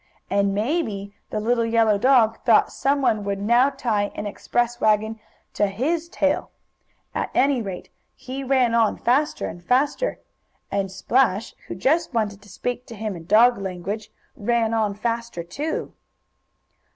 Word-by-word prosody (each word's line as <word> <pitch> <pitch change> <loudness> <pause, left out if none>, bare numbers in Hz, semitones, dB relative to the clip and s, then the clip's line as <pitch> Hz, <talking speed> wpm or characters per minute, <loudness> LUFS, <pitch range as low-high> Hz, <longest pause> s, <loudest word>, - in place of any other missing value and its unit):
And 200 0 +2
maybe 210 - -2 0.2
the 215 - -2
little 230 +2 +1
yellow 225 -2 +3
dog 230 -2 +4
thought 230 -3 +4
some 275 0 0
one 215 -5 +2
would 200 -1 -2
now 240 +6 +4
tie 225 -7 -1
an 210 - -4
express 240 +3 -1
wagon 220 +1 +2 0.3
to 205 - +2
his 315 +12 -1
tail. 290 -4 0 0.6
At - - -2
any 270 -1 +3
rate 195 -4 -7 0.2
he 265 +1 -6
ran 255 -3 +2
on 230 -2 +3
faster 275 +5 +1
and 175 +2 -7
faster, 280 - +1 0.5
And 195 -1 -1
Splash, 220 +1 +1
who - - -5
just 280 - +1
wanted 205 -3 -1
to 205 - -17
speak 245 +6 -4
to 230 - -9
him, 215 -2 -4
in 165 -1 -10
dog 225 +4 +5
language, 195 +3 -5 0.2
ran 230 +1 0
on 215 -3 0
faster 230 -4 -3
too. 285 - -4
225 Hz, 150 wpm, -23 LUFS, 205-255 Hz, 0.6 s, dog